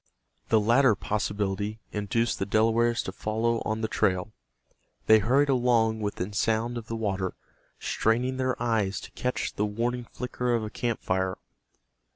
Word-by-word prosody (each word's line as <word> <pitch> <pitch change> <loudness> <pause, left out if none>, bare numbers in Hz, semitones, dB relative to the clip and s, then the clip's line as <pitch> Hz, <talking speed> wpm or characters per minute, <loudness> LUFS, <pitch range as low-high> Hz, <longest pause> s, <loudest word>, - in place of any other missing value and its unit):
The 110 - +5
latter 115 +2 +4
possibility 105 +1 -2
induced 115 +3 0
the 95 - 0
Delawares 115 +2 +2
to - - -4
follow 110 +3 -1
on 110 +1 -1
the 110 - 0
trail. 100 -1 0 0.7
They 110 0 +7
hurried 130 +8 +3
along 120 -4 +3
within 105 -2 -3
sound 115 +3 0
of 115 -1 -6
the 115 - -3
water, 95 -4 -2 0.4
straining 125 +4 0
their 130 0 -1
eyes 110 -4 0
to - - -10
catch 125 0 -2
the 105 - 0
warning 120 +3 -2
flicker 125 -1 -1
of 115 - -1
a 105 - -5
camp 120 -3 -2
fire. 95 0 0
110 Hz, 155 wpm, -27 LUFS, 105-120 Hz, 0.7 s, They